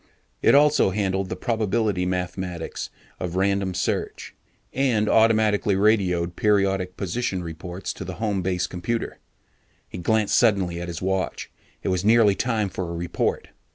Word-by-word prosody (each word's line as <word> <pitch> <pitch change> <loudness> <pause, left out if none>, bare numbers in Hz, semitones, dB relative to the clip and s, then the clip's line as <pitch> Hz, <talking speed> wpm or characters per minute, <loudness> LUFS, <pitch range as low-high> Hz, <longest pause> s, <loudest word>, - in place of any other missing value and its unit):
It - - +5
also 145 -6 +5
handled 95 -1 -1
the - - -3
probability 110 -4 0
mathematics 90 -1 -4 0.3
of 90 -1 -4
random 95 -1 0
search, - - -3 0.4
and 120 -6 +1
automatically 110 -3 +3
radioed 95 -4 +2
periodic 95 -3 +1
position 95 -1 -2
reports 90 +3 -6
to - - -7
the - - -6
home 105 -4 -1
base 90 0 0
computer. 115 +7 -4 0.7
He - - -8
glanced 110 +3 +1
suddenly 95 -7 +2
at 85 - -5
his 85 0 -6
watch, 95 0 -2 0.3
it - - -1
was 90 -1 0
nearly 110 -1 +5
time 110 -2 -1
for 95 -2 -4
a 85 - -4
report. 85 +1 -2
95 Hz, 145 wpm, -24 LUFS, 90-110 Hz, 0.7 s, It